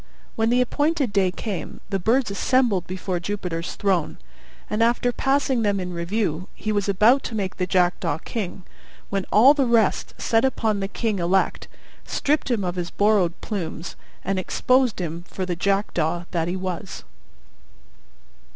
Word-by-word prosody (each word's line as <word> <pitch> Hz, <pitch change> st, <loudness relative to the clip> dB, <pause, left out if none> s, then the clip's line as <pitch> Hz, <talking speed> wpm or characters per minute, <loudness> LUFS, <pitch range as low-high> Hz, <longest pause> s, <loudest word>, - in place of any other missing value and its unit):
When 225 Hz, 0 st, +1 dB
the 245 Hz, +1 st, +3 dB
appointed 290 Hz, -1 st, 0 dB
day 195 Hz, -2 st, +3 dB
came, 190 Hz, +1 st, -5 dB
the 195 Hz, -, 0 dB
birds 230 Hz, +4 st, +2 dB
assembled 215 Hz, -3 st, +1 dB
before 185 Hz, -1 st, -3 dB
Jupiter's 175 Hz, -3 st, -4 dB
throne; 190 Hz, -6 st, 0 dB, 0.5 s
and, 210 Hz, +1 st, -1 dB
after 240 Hz, +1 st, +3 dB
passing 270 Hz, -1 st, +1 dB
them 205 Hz, -2 st, +1 dB
in 180 Hz, -1 st, -4 dB
review, 175 Hz, -1 st, -2 dB
he 215 Hz, -, -3 dB
was 205 Hz, -1 st, 0 dB
about 220 Hz, +7 st, +5 dB
to 230 Hz, -, -4 dB
make 195 Hz, -3 st, -3 dB
the 180 Hz, -1 st, -1 dB
Jackdaw 175 Hz, -3 st, +1 dB
king, 190 Hz, 0 st, -5 dB, 0.5 s
when 195 Hz, -2 st, -1 dB
all 250 Hz, +7 st, +7 dB
the 275 Hz, -4 st, +1 dB
rest 230 Hz, -4 st, +2 dB
set 225 Hz, 0 st, +2 dB
upon 225 Hz, -5 st, +1 dB
the 195 Hz, -, -2 dB
king 210 Hz, 0 st, -2 dB
elect, 180 Hz, +3 st, +1 dB, 0.4 s
stripped 300 Hz, 0 st, 0 dB
him 230 Hz, -5 st, +1 dB
of 180 Hz, 0 st, -3 dB
his 175 Hz, -1 st, -2 dB
borrowed 200 Hz, -3 st, +2 dB
plumes, 175 Hz, -4 st, -5 dB, 0.3 s
and 195 Hz, 0 st, 0 dB
exposed 255 Hz, +4 st, +2 dB
him 170 Hz, -1 st, -4 dB
for 190 Hz, -, -4 dB
the 180 Hz, -1 st, -2 dB
Jackdaw 175 Hz, -3 st, 0 dB
that 165 Hz, -2 st, 0 dB
he 175 Hz, -, -1 dB
was. 185 Hz, +1 st, -5 dB
200 Hz, 160 wpm, -23 LUFS, 180-230 Hz, 0.5 s, all